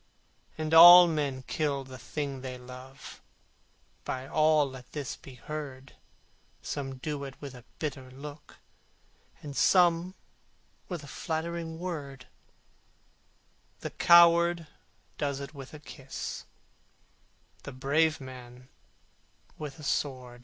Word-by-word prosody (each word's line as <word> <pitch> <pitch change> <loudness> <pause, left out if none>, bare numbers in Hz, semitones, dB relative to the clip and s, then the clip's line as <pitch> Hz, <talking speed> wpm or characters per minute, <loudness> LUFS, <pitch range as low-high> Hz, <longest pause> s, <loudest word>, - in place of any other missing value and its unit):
And 155 0 -3
all 175 +2 +11
men 145 -5 -2
kill 140 -1 -1
the 130 -1 -11
thing 135 +3 -5
they 130 -1 -6
love, 125 +1 -12 0.8
By 130 +1 -4
all 155 -1 +3
let 130 -2 -12
this 145 -3 -4
be 130 - -13
heard, 135 -2 -7 0.7
Some 135 -2 -4
do 145 +1 -4
it 135 -1 -9
with 140 -2 -8
a 125 -1 -13
bitter 135 -4 -5
look, 145 +3 -11 0.9
Some 175 +4 +3 0.7
with 175 -5 -5
a - - -11
flattering 165 +1 -4
word, 145 -7 -6 1.6
The - - -5
coward 170 0 +6 0.5
does 140 -2 -1
it 140 +2 -8
with 135 -3 -10
a 150 - -10
kiss, 135 -2 -7 1.2
The - - -8
brave 150 +5 +1
man 125 -1 -11 0.9
with 150 -1 -6
a 155 - -12
sword! 130 -4 -2
145 Hz, 115 wpm, -29 LUFS, 130-160 Hz, 1.6 s, all